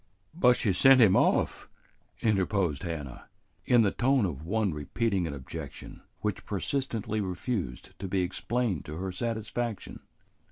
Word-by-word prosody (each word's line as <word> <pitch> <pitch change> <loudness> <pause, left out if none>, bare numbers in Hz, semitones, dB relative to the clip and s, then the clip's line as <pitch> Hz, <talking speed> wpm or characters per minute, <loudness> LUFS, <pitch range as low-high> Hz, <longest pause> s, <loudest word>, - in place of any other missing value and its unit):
"But 125 -7 +5
she 100 -5 +1
sent 135 +8 +7
him 105 -5 +6
off," - - +2 0.5
interposed 95 -7 +1
Hannah, 75 -7 -6 0.4
in 120 -2 +5
the 100 - +2
tone 130 -2 +2
of 75 -5 -4
one 100 +1 0
repeating 95 +5 -1
an 70 - -4
objection 65 -2 -8 0.2
which 105 -3 -2
persistently 110 0 -2
refused 95 - -4
to 95 - -4
be 95 0 0
explained 95 - -1
to 75 - -7
her 95 +1 -3
satisfaction. 115 +1 -4
100 Hz, 135 wpm, -29 LUFS, 90-115 Hz, 0.5 s, sent